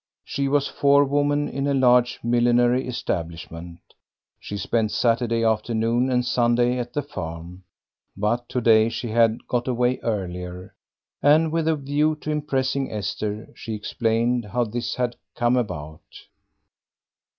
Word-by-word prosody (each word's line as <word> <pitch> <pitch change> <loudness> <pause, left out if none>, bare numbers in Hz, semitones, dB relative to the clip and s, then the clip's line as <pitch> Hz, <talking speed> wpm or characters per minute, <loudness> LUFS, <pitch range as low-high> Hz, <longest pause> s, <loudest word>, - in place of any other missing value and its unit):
She 140 0 -2
was 140 0 +2
forewoman 145 +1 +2
in 140 +1 -3
a 140 - +1
large 125 -2 +3
millinery 120 +2 +2
establishment. 85 -6 -5 0.6
She 100 - -6
spent 110 +2 0
Saturday 115 -1 +1
afternoon 115 +2 +1
and 125 -1 +1
Sunday 120 0 +2
at 120 0 -5
the 145 - -1
farm, 85 - -8 0.5
but 120 +4 -1
to 125 - -1
day 110 -1 +5
she 115 +1 -4
had 115 0 +2
got 120 0 -1
away 125 0 +1
earlier, 90 -3 -4 0.5
and 155 +2 +4
with 165 -1 0
the 160 0 +2
view 145 +2 0
to 155 - -3
impressing 140 -2 -1
Esther, 105 +1 -4
she 110 - -6
explained 115 +2 0
how 120 +5 0
this 120 +2 -3
had 125 -1 -2 0.2
come 120 +1 +2
about. 80 -10 -3
120 Hz, 135 wpm, -23 LUFS, 110-130 Hz, 0.6 s, day